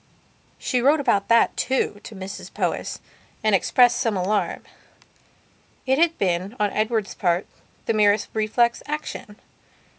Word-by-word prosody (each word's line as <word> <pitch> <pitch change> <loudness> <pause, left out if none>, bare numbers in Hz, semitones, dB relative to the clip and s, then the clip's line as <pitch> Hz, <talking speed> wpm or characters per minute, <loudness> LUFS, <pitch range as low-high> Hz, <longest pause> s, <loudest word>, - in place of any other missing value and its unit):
She 250 -2 -1
wrote 290 +5 +4
about 235 -8 +1
that, 230 0 +4
too, 255 -5 -1
to 220 - -9
Mrs 190 +1 -8
Powys, - - -2 0.5
and 215 -1 +2
expressed 245 +5 +4
some 220 -4 0
alarm. 200 +3 -1 1.2
It 265 +2 +2
had 335 0 +3
been, 185 +3 -1
on 205 -1 +1
Edward's 215 -1 -1
part, 175 0 0 0.4
the - - +1
merest 210 -1 +3
reflex 230 +2 +1
action. 300 -8 -5
215 Hz, 130 wpm, -23 LUFS, 200-245 Hz, 1.2 s, wrote